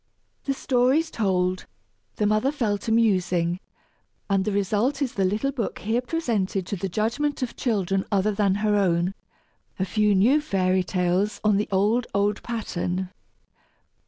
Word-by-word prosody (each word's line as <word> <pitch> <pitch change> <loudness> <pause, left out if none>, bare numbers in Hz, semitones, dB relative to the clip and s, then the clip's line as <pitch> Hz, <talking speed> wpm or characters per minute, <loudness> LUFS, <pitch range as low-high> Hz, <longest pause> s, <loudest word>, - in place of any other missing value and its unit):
The 275 - 0
stories 265 +6 +2
told, 185 -3 0 0.5
the 210 - 0
mother 215 +6 +2
fell 220 -8 -1
to 225 - -4
musing, 180 -6 +2 0.7
and 195 -1 +2
the 210 - 0
result 210 +7 0
is 275 -4 -1
the 195 - 0
little 210 +9 0
book 245 -6 -3
here 225 +4 -1
presented 225 - -1
to 200 - -3
the 195 +1 -3
judgment 245 +9 -1
of 245 - -4
children 195 -6 0
other 200 +1 +2
than 200 -2 +1
her 210 -1 +3
own 180 -2 +1 0.6
a 190 - 0
few 210 +1 +2
new 250 +11 +4
fairy 185 -8 +1
tales, 185 +3 0
on 210 -2 +3
the 210 - -1
old, 210 +5 +2
old 205 +1 +1
pattern! 185 -5 -3
205 Hz, 155 wpm, -25 LUFS, 190-235 Hz, 0.7 s, new